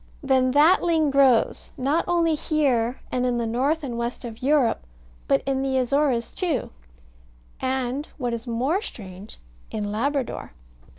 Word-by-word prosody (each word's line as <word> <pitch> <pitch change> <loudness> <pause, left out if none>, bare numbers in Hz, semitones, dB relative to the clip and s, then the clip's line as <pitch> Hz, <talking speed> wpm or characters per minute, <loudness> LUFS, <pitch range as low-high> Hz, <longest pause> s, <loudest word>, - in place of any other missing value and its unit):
Then 260 -2 +3
that 305 +6 +5
ling 320 -4 +2
grows, 270 -4 +3
not 280 +5 +1
only 340 -2 +2
here 270 -6 0
and 250 - 0
in 250 -1 +1
the 235 - -1
north 270 +8 0
and 240 -4 -4
west 235 +1 -4
of 225 -2 -8
Europe, 275 -3 +2 0.5
but 135 - +2
in 270 -1 0
the 265 -1 0
Azores 260 -2 +1
too; 330 -10 -1 0.9
and, 260 +2 -2
what 245 -4 -2
is 235 +1 -5
more 260 - 0
strange, 195 - -9 0.3
in 205 -1 -3
Labrador. 260 - -2
260 Hz, 145 wpm, -24 LUFS, 235-290 Hz, 0.9 s, that